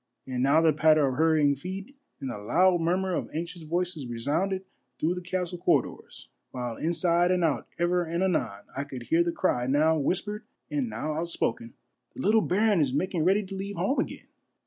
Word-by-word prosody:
And 130 -1 -3
now 140 +5 +4
the 160 -1 +4
patter 155 0 +4
of 130 - -1
hurrying 155 -3 +3
feet 190 - -7 0.2
and 135 - -4
the 105 - -6
loud 175 - +3
murmur 185 +3 0
of - - -2
anxious 170 +1 -4
voices 165 -3 -2
resounded 150 +12 -1 0.3
through 160 +6 +1
the 180 - -5
castle 180 -1 -3
corridors, - - -1 0.2
while 125 -2 -4
inside 170 +3 +2
and 180 -1 +2
out 160 -4 0
ever 175 +1 +1
and 170 +2 -2
anon 120 - -1
I 140 - -2
could 130 -4 -8
hear 165 +8 +3
the 170 - -1
cry 125 -9 0
now 155 +4 +3
whispered 205 +8 -1 0.3
and 280 -5 -1
now 155 -7 -3
outspoken, 150 -8 -2
— - - -51
" - - -48
The - - -6
little 215 +3 +4
baron 205 -1 +2
is 140 -4 +1
making 175 0 0
ready 195 +3 +3
to 195 - -9
leave 195 +1 -5
home 195 - 0
again." - - -3
170 Hz, 195 wpm, -27 LUFS, 145-185 Hz, 0.3 s, now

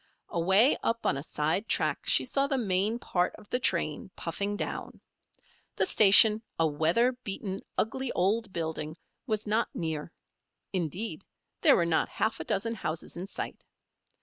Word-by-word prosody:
Away 190 - +4
up 230 0 -2
on - - +2
a 140 - -4
side 160 +7 -1
track - - 0
she - - +4
saw 275 0 0
the 275 -1 0
main 205 0 +1
part 180 -6 -1
of - - -16
the 250 - 0
train, 170 - -1
puffing 200 +5 -3
down. - - -5 0.8
The - - +2
station, 215 - +7 0.2
a 165 - +2
weather 160 - +2
beaten, 200 -5 -5 0.2
ugly 260 +3 -1
old 205 +3 0
building, 160 -2 -4 0.3
was 215 -2 -2
not 220 +2 0
near. 160 -1 -4 0.6
Indeed, 185 +2 -3 0.4
there - - +6
were 170 - +2
not 170 -1 +1
half 220 - -2
a - - -4
dozen 215 +7 -2
houses 170 -7 -4
in 180 +3 -6
sight. - - -6
195 Hz, 155 wpm, -28 LUFS, 165-225 Hz, 0.8 s, station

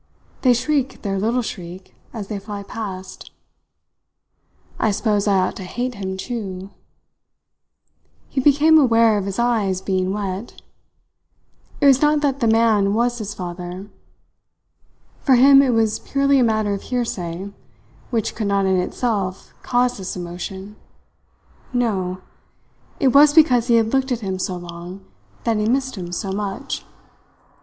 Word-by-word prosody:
They 250 -2 +5
shriek 275 +1 -1
their 195 -2 -1
little 235 +5 0
shriek 180 -3 -8 0.2
as 215 -4 -6
they 210 -1 -4
fly 205 0 -7
past. 195 -3 -7 1.5
I 220 - +2
suppose 210 0 0
I 200 -1 +3
ought 185 -1 0
to 190 - -7
hate 245 +7 -3
him 190 -2 -5
too.. 195 -4 -6 0.8
." - - -42
He 265 - 0
became 295 +3 +5
aware 230 -5 +4
of 195 - -4
his 195 -1 -4
eyes 220 -6 +1
being 190 -1 -1
wet. 200 +1 -5 1.2
It 290 - +2
was 270 -2 +6
not 300 0 +3
that 275 -2 0
the 235 - +1
man 220 -3 +3
was 240 +1 0
his 210 -1 -5
father. 180 +2 -7 1.3
For 265 - +4
him 275 +2 +7
it 275 - +2
was 225 -2 +1
purely 275 0 +2
a - - +4
matter 215 -3 +1
of 200 - -4
hearsay 200 -6 -4 0.6
which 225 -4 -1
could 215 - -3
not 200 -1 +1
in 190 -1 +2
itself 195 0 -2
cause 245 -2 0
this 190 -1 -5
emotion. 190 +3 -7 1.0
No! 190 -7 -1 0.8
It 270 - +4
was 290 +3 +6
because 250 -7 +5
he 235 - +4
had 225 0 +2
looked 265 0 +1
at 240 -2 -1
him 190 -2 -3
so 185 0 -2
long 175 +2 -9 0.4
that 230 -2 +1
he 210 +1 0
missed 265 +1 0
him 175 -3 -6
so 190 +2 -3
much. 205 +7 -4
210 Hz, 150 wpm, -21 LUFS, 190-245 Hz, 1.5 s, him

